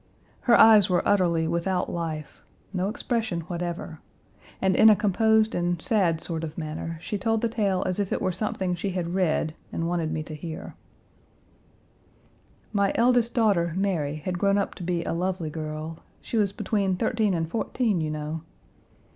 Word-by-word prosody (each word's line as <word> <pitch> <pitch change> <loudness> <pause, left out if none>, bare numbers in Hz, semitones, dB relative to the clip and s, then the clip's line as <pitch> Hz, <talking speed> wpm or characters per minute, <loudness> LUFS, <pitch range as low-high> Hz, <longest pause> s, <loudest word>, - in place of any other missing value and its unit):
Her 235 - +7
eyes 215 -4 +7
were 180 -1 +1
utterly 170 -5 +2
without 170 +2 0
life; 160 -4 -5 0.3
no 185 +1 0
expression 220 -6 -2
whatever, 170 0 -5 0.6
and 190 -1 +2
in 220 - +8
a 215 - +7
composed 220 +2 +3
and 175 -1 0
sad 175 -5 +1
sort 165 -1 -4
of 155 -2 -6
manner 160 +1 -4
she 205 +5 -4
told 225 +2 +1
the 235 - +2
tale 200 -5 0
as 185 +2 -1
if 200 -2 -1
it - - 0
were 185 - 0
something 190 -1 -2
she 180 +2 -3
had 175 -2 -2
read 165 -4 +1 0.2
and 165 - -2
wanted 170 -2 -1
me 155 -1 -2
to 155 - -9
hear: 160 +1 -7 2.0
"My 200 -1 +2
eldest 240 0 +3
daughter, 195 -8 +2
Mary, 170 -7 0
had 175 +4 -4
grown 200 +1 +3
up 200 - -1
to 180 - -7
be 175 -1 -1
a - - -2
lovely 180 -2 -2
girl. 155 +1 -5 0.2
She - - -6
was 205 -3 +2
between 200 -2 0
thirteen 210 +1 +1
and 165 -1 -1
fourteen, 220 0 0
you 155 - -1
know. 155 +1 -4
180 Hz, 170 wpm, -26 LUFS, 165-205 Hz, 2.0 s, in